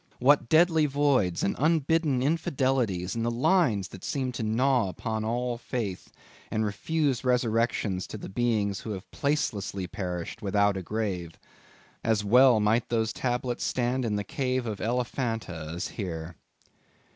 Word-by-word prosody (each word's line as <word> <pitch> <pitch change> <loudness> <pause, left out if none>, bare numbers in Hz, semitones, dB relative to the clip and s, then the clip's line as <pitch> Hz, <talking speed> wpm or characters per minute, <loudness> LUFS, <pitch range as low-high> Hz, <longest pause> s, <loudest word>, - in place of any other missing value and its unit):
What 135 -1 +4
deadly 160 -1 +5
voids 135 -11 +1
and - - +1
unbidden 155 -3 +2
infidelities 130 - 0
in 115 - -1
the 115 - +1
lines 120 - +2
that 95 - -11
seem 130 -3 -2
to 125 - -5
gnaw 115 0 +2
upon 110 +3 -3
all 120 +1 -1
Faith, 110 -7 -4 0.4
and 110 0 0
refuse 140 +5 -1
resurrections 115 -6 +1
to - - -7
the - - -8
beings 105 -3 0
who 110 - -5
have 95 +1 -9
placelessly 105 -10 -1
perished 90 -2 -5
without 100 0 +2
a 95 - -3
grave. 95 -4 -3 0.7
As 110 -2 +1
well 125 +2 +6
might 110 +3 +2
those 115 -1 0
tablets 125 -1 -2
stand 125 +1 0
in 110 -3 0
the 105 - -1
cave 130 -2 -1
of 110 -3 -4
Elephanta 115 - -2
as 90 - -3
here. 85 -4 -5
115 Hz, 145 wpm, -27 LUFS, 100-130 Hz, 0.7 s, well